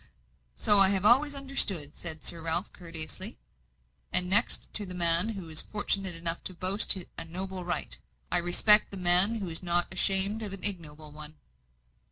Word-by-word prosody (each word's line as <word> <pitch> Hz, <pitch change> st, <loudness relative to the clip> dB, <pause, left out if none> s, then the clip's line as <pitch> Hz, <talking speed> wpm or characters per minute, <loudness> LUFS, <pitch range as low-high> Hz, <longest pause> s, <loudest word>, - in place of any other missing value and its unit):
"So 205 Hz, -, +2 dB
I 195 Hz, -1 st, +6 dB
have 195 Hz, 0 st, -3 dB
always 280 Hz, +6 st, +1 dB
understood," 205 Hz, -, -2 dB
said 160 Hz, -2 st, -8 dB
Sir 170 Hz, -, -1 dB
Ralph, 165 Hz, +3 st, -1 dB
courteously. 165 Hz, -3 st, -7 dB, 0.7 s
"And 180 Hz, -, +3 dB
next 210 Hz, +6 st, +2 dB
to 210 Hz, -, -2 dB
the 180 Hz, -, -9 dB
man 170 Hz, +3 st, +6 dB
who 195 Hz, -6 st, -9 dB
is 160 Hz, 0 st, -4 dB
fortunate 195 Hz, -3 st, -4 dB
enough 165 Hz, 0 st, -1 dB
to 185 Hz, -, -9 dB
boast 190 Hz, +3 st, +4 dB, 0.2 s
a -, -, -3 dB
noble 185 Hz, +3 st, -9 dB
origin, 175 Hz, -1 st, -6 dB, 0.3 s
I -, -, 0 dB
respect 210 Hz, +5 st, +4 dB
the 195 Hz, -, -9 dB
man 180 Hz, +4 st, +5 dB
who 205 Hz, -4 st, -7 dB
is 165 Hz, 0 st, -7 dB
not 175 Hz, -1 st, -2 dB
ashamed 195 Hz, +3 st, -1 dB
of 205 Hz, -3 st, -9 dB
an 195 Hz, -, -12 dB
ignoble 155 Hz, -6 st, -5 dB
one." 150 Hz, +1 st, -11 dB
180 Hz, 175 wpm, -26 LUFS, 165-200 Hz, 0.7 s, I